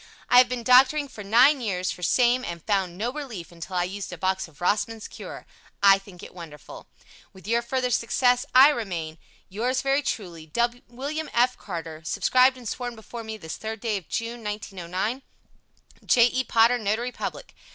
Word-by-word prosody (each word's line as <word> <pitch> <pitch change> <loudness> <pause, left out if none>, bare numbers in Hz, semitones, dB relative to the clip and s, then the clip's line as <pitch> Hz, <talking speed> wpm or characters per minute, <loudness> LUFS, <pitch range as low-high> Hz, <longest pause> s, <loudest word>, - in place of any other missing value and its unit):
I 245 - +8
have 250 -1 +5
been 250 -2 -3
doctoring 260 +4 +5
for 210 - -9
nine 250 +7 +5
years 185 -5 -1
for 180 - -9
same 245 +6 +3
and 170 -5 -6
found 190 -4 0
no 235 +5 -2
relief 245 - -7
until 170 +2 -8
I 175 - +2
used 195 +2 -5
a 180 - -7
box 190 +2 -1
of 150 -3 -21
Rossman's 210 +4 -1
Cure. - - -9 0.4
I 195 -1 +7
think 195 -3 -14
it - - -11
wonderful. 160 -6 -11 0.5
Wishing 195 +4 -5
you 235 - +3
further 250 +1 -1
success, 245 +2 +2
I 265 +3 +9
remain, 175 - -4 0.3
Yours 240 +7 -1
very 275 +1 +2
truly, 175 - -5
WM. 245 - -3
F. 250 +1 +3
CARTER. 165 -6 -7
Subscribed 255 +10 +3
and 245 -2 -9
sworn 245 +2 -4
before 230 +1 -9
me 220 0 -6
this 160 -6 -8
3rd 220 -1 -5
day 220 -3 -1
of 185 - -10
June, 230 0 -4
1909 205 +2 -4 0.8
J. 235 -2 +5
E. 260 +1 +1
POTTER, 230 +2 +4
Notary 220 +4 -1
Public. - - -6
225 Hz, 180 wpm, -25 LUFS, 185-250 Hz, 0.8 s, I